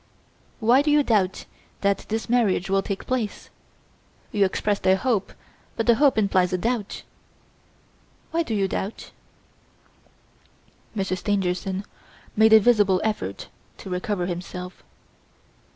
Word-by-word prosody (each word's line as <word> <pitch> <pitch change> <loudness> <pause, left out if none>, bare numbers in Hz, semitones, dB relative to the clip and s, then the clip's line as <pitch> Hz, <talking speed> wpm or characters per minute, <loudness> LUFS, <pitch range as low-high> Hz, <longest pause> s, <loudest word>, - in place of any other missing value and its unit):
Why 240 +4 +4
do 300 - 0
you 295 0 +4
doubt 195 -7 +1 0.4
that 200 0 0
this 220 +1 -2
marriage 215 -6 +1
will 195 0 +3
take 195 0 -5
place? 240 -5 -3 0.8
You 205 -1 +3
expressed 200 +1 -1
a 190 - +6
hope; 210 0 -1 0.4
but 225 - -1
the 235 - +6
hope 275 +1 +3
implies 190 -3 +2
a 185 - +1
doubt. 225 +1 -2 1.3
Why 335 - +1
do 235 -9 -2
you 195 -2 +1
doubt?" 195 +3 -5 1.8
Monsieur 190 -2 -1
Stangerson 190 0 -1 0.5
made 220 +1 +5
a 220 - +9
visible 205 -4 +3
effort 210 - -3 0.3
to 190 - -9
recover 180 0 -2
himself. 180 +1 -6
200 Hz, 125 wpm, -24 LUFS, 185-225 Hz, 1.8 s, a